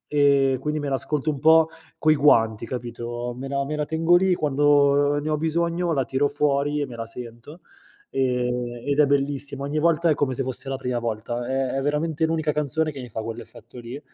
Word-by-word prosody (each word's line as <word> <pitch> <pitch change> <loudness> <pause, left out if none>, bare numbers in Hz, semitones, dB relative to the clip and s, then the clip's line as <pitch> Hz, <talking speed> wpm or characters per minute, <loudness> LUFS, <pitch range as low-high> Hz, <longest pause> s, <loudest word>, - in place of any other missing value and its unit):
ehm, 140 -2 +3
quindi 150 +2 -2
me 145 - -3
l'ascolto 145 +2 -1
un 145 -3 -5
po' 160 +1 +6 0.3
coi 155 0 +4
guanti, 115 -7 +3
capito? 120 0 -5
Me 135 +2 -6
la 140 0 -1
me 150 +2 -4
la 150 0 -1
tengo 165 +2 +2
lì, 185 +1 +4
quando 145 -1 +3
ne 150 +1 -3
ho 155 - +1
bisogno 170 +2 0
la 135 -4 +1
tiro 135 +3 0
fuori 145 0 0
e 145 - -1
me 125 - -10
la 115 -1 -5
sento, 120 +6 -10 0.5
ehm, 125 -2 -1
ed 145 +1 +2
è - - +7
bellissima. 140 0 -1
Ogni 150 +2 -1
volta 170 +1 +2
è 155 - +4
come 140 -2 0
se 135 +1 -2
fosse 130 +1 -5
la 135 - -2
prima 125 -2 -3
volta. 120 +1 -3
È 130 -1 -1
è 135 - -1
veramente 150 +3 -1
l'unica 160 -1 0
canzone 150 +1 -1
che 140 - -8
mi 125 - -8
fa 110 0 -5
quell'effetto 115 +2 -9
lì. 120 +4 -8
140 Hz, 210 wpm, -24 LUFS, 125-150 Hz, 0.5 s, è